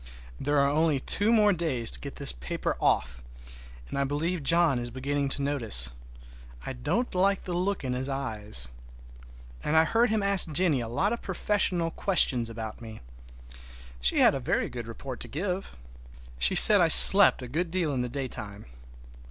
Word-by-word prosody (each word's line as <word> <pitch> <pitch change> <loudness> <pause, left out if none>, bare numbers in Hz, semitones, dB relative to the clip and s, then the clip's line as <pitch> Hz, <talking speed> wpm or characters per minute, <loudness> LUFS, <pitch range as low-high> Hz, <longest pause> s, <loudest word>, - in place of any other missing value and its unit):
There 145 +1 -2
are 140 0 +2
only 150 0 0
two 205 - 0
more 210 -3 +3
days 155 -9 0
to 60 - +4
get - - -9
this - - -2
paper - - -5
off, 60 -1 -1 0.7
and 140 - -6
I - - 0
believe 155 +5 -3
John 165 -2 +1
is 120 0 -5
beginning 140 +3 -4
to 140 +1 -3
notice. 115 - -3 0.7
I - - -6
don't 160 - -3
like 195 +2 0
the 180 - -6
look 185 +1 -3
in 130 -1 -3
his 130 +2 -3
eyes. 105 - -5 0.9
And 160 - -1
I 160 - +5
heard 230 +6 0
him 215 -1 -1
ask 195 -4 +4
Jennie 155 -3 +1
a 115 - -6
lot 190 - -2
of 235 - -6
professional 185 -3 -1
questions 130 - +1
about 110 -1 -9
me. 110 -2 -11 1.0
She - - -1
had - - +4
a - - -4
very - - -2
good 120 -2 -8
report 125 +2 -9
to - - -6
give. 180 - -6 0.6
She 60 - +2
said - - +9
I - - +3
slept 65 - +8
a - - -7
good 165 +7 -3
deal 170 -4 -2
in 130 - -2
the 125 - -4
daytime. 115 -6 -8
140 Hz, 180 wpm, -26 LUFS, 120-180 Hz, 1.0 s, said